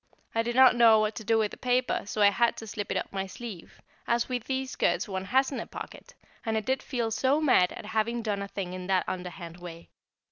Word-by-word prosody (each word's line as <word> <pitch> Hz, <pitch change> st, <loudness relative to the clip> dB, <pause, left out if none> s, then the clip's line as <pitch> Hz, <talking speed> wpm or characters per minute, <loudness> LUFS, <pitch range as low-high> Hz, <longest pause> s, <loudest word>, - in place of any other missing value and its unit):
I 225 Hz, -, +2 dB
did 235 Hz, +1 st, -3 dB
not 260 Hz, -1 st, +7 dB
know 230 Hz, -2 st, +6 dB
what 215 Hz, 0 st, +1 dB
to 220 Hz, -, -6 dB
do 225 Hz, +2 st, +2 dB
with 215 Hz, -2 st, +1 dB
the -, -, -9 dB
paper, 250 Hz, 0 st, +1 dB
so 210 Hz, 0 st, 0 dB
I 200 Hz, -, +7 dB
had 235 Hz, +3 st, +2 dB
to 225 Hz, -, -7 dB
slip 205 Hz, -1 st, -5 dB
it -, -, 0 dB
up -, -, -4 dB
my 195 Hz, 0 st, -2 dB
sleeve, 205 Hz, -2 st, -9 dB, 0.3 s
as 235 Hz, 0 st, +1 dB
with 250 Hz, -3 st, -3 dB
these 265 Hz, 0 st, -2 dB
skirts -, -, 0 dB
one 190 Hz, -1 st, -4 dB
hasn't 265 Hz, +5 st, +1 dB
a -, -, -8 dB
pocket, -, -, -10 dB, 0.3 s
and 220 Hz, -1 st, -1 dB
I -, -, 0 dB
did 260 Hz, +4 st, -1 dB
feel 235 Hz, -4 st, -2 dB
so 265 Hz, +6 st, +2 dB
mad 250 Hz, -12 st, +4 dB
at -, -, -8 dB
having 225 Hz, +2 st, -1 dB
done 205 Hz, -2 st, -1 dB
a 200 Hz, -, -4 dB
thing 190 Hz, -2 st, -5 dB
in 185 Hz, 0 st, -6 dB
that 190 Hz, -1 st, +2 dB
underhand 180 Hz, -2 st, -6 dB
way. 170 Hz, -1 st, -10 dB
220 Hz, 245 wpm, -28 LUFS, 195-240 Hz, 0.3 s, not